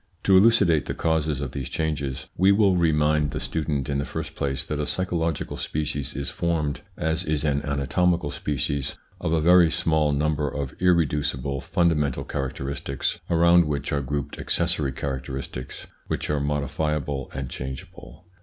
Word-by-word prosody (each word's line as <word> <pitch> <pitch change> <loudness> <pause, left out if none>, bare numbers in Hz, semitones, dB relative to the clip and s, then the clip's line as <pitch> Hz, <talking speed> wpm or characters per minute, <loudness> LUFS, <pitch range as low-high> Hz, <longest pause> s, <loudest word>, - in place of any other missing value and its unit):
To 95 - +5
elucidate 95 -7 +5
the - - -3
causes 80 -3 0
of 70 -3 -3
these 70 -3 -5
changes, 75 -5 -2
we 95 +2 +5
will 100 -2 +4
remind 75 -3 +2
the - - -3
student 75 -4 -2
in 70 -1 -1
the - - 0
first - - -5
place 70 -1 -2
that 75 - -3
a 75 - -1
psycho 95 -1 -2
logical 80 -2 -1
species 75 -3 -2
is 70 0 -2
formed, 80 -4 -1 0.2
as 80 +2 0
is 75 -3 -1
an 70 -1 +1
anatomical 75 +3 +1
species, 70 -1 -2 0.2
of - - -2
a 80 - +3
very 85 +1 +6
small 80 -3 +2
number 75 +1 0
of 70 -3 -4
irreducible, 75 -6 +1
fundamental 75 -3 +1
characteristics 70 0 -3
around 85 +1 +5
which 75 -1 -2
are 70 - +1
grouped 70 +1 -4
accessory 85 -5 +1
characteristics 65 -1 -5 0.2
which - - -2
are 75 - +1
modifiable 75 -1 -1
and 65 -2 -4
changeable. 65 +5 -8
75 Hz, 155 wpm, -25 LUFS, 70-80 Hz, 0.2 s, very